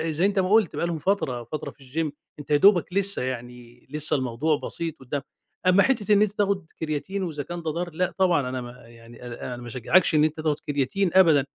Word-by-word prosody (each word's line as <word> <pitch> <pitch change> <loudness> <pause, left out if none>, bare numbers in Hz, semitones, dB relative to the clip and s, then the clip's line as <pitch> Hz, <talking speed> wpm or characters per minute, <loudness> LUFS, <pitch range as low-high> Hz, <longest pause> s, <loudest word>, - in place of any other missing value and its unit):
زي 170 +5 +2
أنت 200 0 +1
ما 185 -1 +1
قُلت 215 -2 +3
بقى 170 - -1
لهم 165 -2 -3
فترة، 145 -9 -1
فترة 150 +7 -6
في - - -28 0.3
الgym، - - -10 0.3
أنت 145 - -10
يا 145 - +6
دوبك 180 -1 +4
لسّه 200 +1 +1
يعني 120 -1 -7
لسّه 150 +1 +1
الموضوع 135 +4 0
بسيط 165 -2 -5
قُدّام. 135 +2 -4 0.5
أمّا 185 +2 +6
حتّة 220 -6 +2
إن 205 - +5
أنت 210 -2 +3
تاخُد 200 -3 0
كرياتين 160 +5 -3
وإذا 155 -5 -4
كان 175 +2 -6
ده 160 -1 -2
ضار، 175 +3 -3
لأ 180 +2 -1
طبعًا 175 -9 +2
أنا 130 0 -4
ما 120 0 -8 0.2
يعني 115 +1 -14
أنا 120 -1 -7
أنا - - -10
ما 120 0 -9
أشجّعكش 145 +9 +2
إن 150 - +5
أنت 155 0 0
تاخُد 155 -2 0
كرياتين 145 +7 -1
أبدًا. 160 -7 +5
155 Hz, 225 wpm, -25 LUFS, 130-185 Hz, 0.5 s, يا